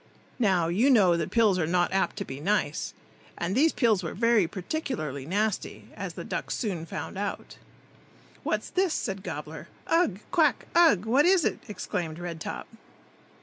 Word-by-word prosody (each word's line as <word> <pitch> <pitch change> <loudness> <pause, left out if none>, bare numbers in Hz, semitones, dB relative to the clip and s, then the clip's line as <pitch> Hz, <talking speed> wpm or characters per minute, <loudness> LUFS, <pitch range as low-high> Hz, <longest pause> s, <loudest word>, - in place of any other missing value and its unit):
Now, 190 -7 +3
you 210 +11 +3
know 195 -9 +5
that 165 -2 -2
pills 215 -5 +3
are 160 - +1
not 175 +1 +1
apt 190 - +1
to - - -4
be 135 +1 -7
nice, 165 -3 -1 0.4
and 175 +2 -2
these 300 +8 +4
pills 220 -7 +2
were 165 - -5
very 230 -4 +3
particularly 175 - -4
nasty, 205 +3 -2
as - - -5
the - - -6
ducks - - -3
soon 180 -8 -3
found 190 - -5
out. 205 -1 -5 0.8
"What's - - -2
this?" 370 -3 +1
said 195 -2 -3
Gobbler. 155 -3 -7 0.2
"Ugh! 325 - +2
quack! 315 -4 +3
ugh! 325 - +5
What 270 +8 +4
is 370 -4 +4
it?" - - 0
exclaimed 180 -5 -4
Red 170 -2 -6
top. - - -5
195 Hz, 165 wpm, -27 LUFS, 170-235 Hz, 0.8 s, know